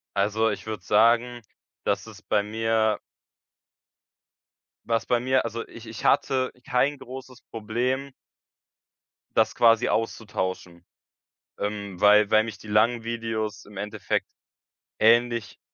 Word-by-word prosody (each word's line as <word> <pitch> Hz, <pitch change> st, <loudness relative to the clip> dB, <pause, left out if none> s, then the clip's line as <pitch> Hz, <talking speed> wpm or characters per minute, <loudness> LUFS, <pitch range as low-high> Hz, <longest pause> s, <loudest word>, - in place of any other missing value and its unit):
Also, 110 Hz, +3 st, +2 dB
ich 105 Hz, -, -6 dB
würde 110 Hz, -4 st, -5 dB
sagen, 115 Hz, +3 st, +3 dB, 0.4 s
dass -, -, -1 dB
es -, -, -12 dB
bei 105 Hz, -, +1 dB
mir 110 Hz, 0 st, 0 dB, 1.8 s
was 115 Hz, -1 st, 0 dB
bei 120 Hz, -1 st, +2 dB
mir 130 Hz, 0 st, +1 dB
also, 115 Hz, 0 st, -4 dB
ich 115 Hz, 0 st, -12 dB
ich 110 Hz, 0 st, -8 dB
hatte 130 Hz, -1 st, +2 dB
kein 135 Hz, +3 st, +1 dB
großes 130 Hz, 0 st, -10 dB
Problem 125 Hz, +5 st, -2 dB, 1.2 s
das -, -, +3 dB
quasi 115 Hz, -2 st, +4 dB
auszutauschen, 95 Hz, -6 st, -3 dB, 0.7 s
ähm, 100 Hz, -3 st, -4 dB
weil 105 Hz, 0 st, +6 dB
weil 110 Hz, 0 st, +5 dB
mich 110 Hz, -5 st, -7 dB
die 105 Hz, -, -13 dB
langen 115 Hz, +3 st, +3 dB
Videos 115 Hz, -3 st, -3 dB
im 105 Hz, -, -15 dB
Endeffekt 105 Hz, 0 st, -2 dB, 0.7 s
ähnlich 120 Hz, -1 st, +3 dB
110 Hz, 120 wpm, -25 LUFS, 105-120 Hz, 1.8 s, weil